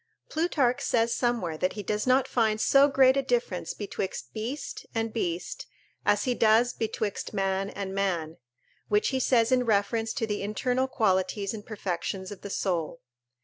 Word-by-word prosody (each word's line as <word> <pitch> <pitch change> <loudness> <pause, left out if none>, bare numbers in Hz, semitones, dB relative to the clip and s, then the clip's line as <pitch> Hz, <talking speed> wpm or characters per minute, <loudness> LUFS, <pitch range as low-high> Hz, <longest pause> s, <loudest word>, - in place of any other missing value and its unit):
Plutarch 280 -6 +1
says 230 -3 +2
somewhere 230 -10 -1
that 185 - 0
he 210 - -6
does 210 +4 -2
not 255 +1 +4
find 220 -3 +1
so 275 +5 +5
great 265 -2 +5
a 275 - +2
difference 235 -10 -1
betwixt 190 - -5
beast 240 +7 -5
and 225 -1 -1
beast 175 -6 -3 0.4
as 205 0 +3
he 250 - +1
does 230 +1 +4
betwixt 215 -2 -3
man 195 0 0
and 195 -1 -5
man; 175 -5 -1 0.5
which 210 0 +2
he 265 - 0
says 235 -2 +3
in 255 -1 +4
reference 225 +1 +1
to 250 -5 -1
the 210 -1 -3
internal 250 +6 0
qualities 200 -3 0
and 215 -1 -8
perfections 190 -2 -4
of 200 - -9
the 200 - -7
soul. 170 -4 -2
215 Hz, 165 wpm, -27 LUFS, 195-245 Hz, 0.5 s, so